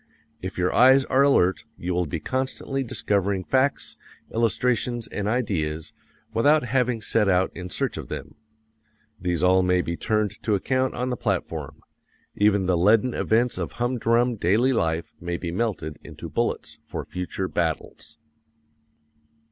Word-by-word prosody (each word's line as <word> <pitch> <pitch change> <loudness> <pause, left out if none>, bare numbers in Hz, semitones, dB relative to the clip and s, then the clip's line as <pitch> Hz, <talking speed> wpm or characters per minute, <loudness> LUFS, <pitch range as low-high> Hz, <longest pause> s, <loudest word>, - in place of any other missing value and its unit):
If 95 +1 -6
your 90 0 +1
eyes 130 +2 +6
are 135 +1 +3
alert 115 -10 +3
you 90 +1 -3
will 90 -1 0
be 80 - -3
constantly 130 - -2
discovering 100 -5 -1
facts, 135 +5 0 0.4
illustrations, 120 +1 +1
and 105 -1 -3
ideas 85 -10 -1 0.4
without 145 +6 +4
having 125 -2 0
set 105 -2 +2
out 95 0 +2
in 90 +1 -6
search - - -2
of - - -6
them. - - -7 0.9
These 90 -2 -1
all 95 +1 +5
may 90 0 +2
be 85 - -3
turned 105 +2 -1
to 105 - +1
account 130 +6 0
on 125 +1 -2
the 125 - -2
platform; 80 - -3 0.5
even 100 -2 +3
the 90 0 +2
leaden 110 +6 +4
events 120 +2 +1
of - - -4
hum 120 +1 -1
drum 120 +1 +2
daily 110 +9 +3
life 80 -6 -1
may 85 0 -3
be 85 -1 -4
melted 90 -6 -2
into - - -9
bullets - - -2
for - - -6
future 90 +1 -4
battles. 80 -4 -3
105 Hz, 150 wpm, -25 LUFS, 90-125 Hz, 0.9 s, eyes